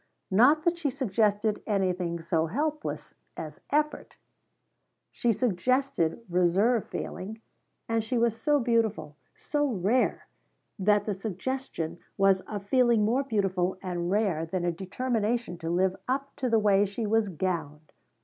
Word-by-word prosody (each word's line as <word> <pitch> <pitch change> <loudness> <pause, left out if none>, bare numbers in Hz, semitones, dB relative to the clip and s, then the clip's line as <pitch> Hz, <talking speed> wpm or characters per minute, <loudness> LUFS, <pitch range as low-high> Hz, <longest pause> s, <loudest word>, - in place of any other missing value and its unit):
Not 265 +10 +5
that 345 0 +1
she 305 -4 0
suggested 215 -4 0
anything 180 -4 0
so 165 -1 0
hopeless 300 - -3 0.2
as - - -7
effort. 300 +1 -1 1.0
She 240 - +1
suggested 230 -2 0
reserve 190 +6 +2
feeling, 215 +4 -6 0.5
and 225 -1 0
she 240 +3 -1
was 230 -1 +2
so 290 +6 +2
beautiful 220 - 0 0.2
so 295 0 -1
rare 225 +2 +1 0.5
that 205 +1 +3
the 210 - -1
suggestion 190 -4 -4 0.2
was 195 -1 +4
of 205 -2 -5
feeling 235 -2 +3
more 240 +5 +2
beautiful 195 -7 0
and 175 -2 -2
rare 195 -5 +1
than 175 +2 -2
a 175 - +2
determination 220 +2 -2
to 165 - -4
live 185 +2 +2
up 275 +2 -2
to 255 - -1
the 225 - +4
way 205 -2 +4
she 210 +3 -4
was 215 -1 +2
gowned. 160 -4 -3
210 Hz, 140 wpm, -28 LUFS, 185-245 Hz, 1.0 s, Not